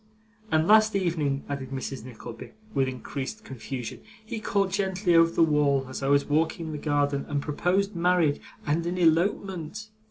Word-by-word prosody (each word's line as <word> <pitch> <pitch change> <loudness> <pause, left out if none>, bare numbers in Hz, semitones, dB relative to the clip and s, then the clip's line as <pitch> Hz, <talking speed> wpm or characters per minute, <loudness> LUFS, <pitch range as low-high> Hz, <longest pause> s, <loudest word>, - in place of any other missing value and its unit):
And 160 +1 +3
last 215 0 +6
evening,' 160 -7 0
added 140 -2 -4
Mrs. 135 -2 -5
Nickleby, 120 -1 -10 0.2
with 135 -5 +2
increased 135 - -5
confusion, 125 -1 -6 0.2
'he 225 0 -4
called 200 -2 0
gently 190 -2 +1
over 165 0 +6
the 165 - +3
wall, 145 -3 +2
as 130 - -6
I 135 - -1
was 140 0 +4
walking 160 +2 0
in 160 - -5
the 150 - -5
garden, 145 -1 0
and 145 - 0
proposed 180 +7 0
marriage, 170 -4 +2 0.2
and 155 +3 +1
an 180 +1 -2
elopement. 180 +3 0
155 Hz, 165 wpm, -27 LUFS, 140-180 Hz, 0.2 s, last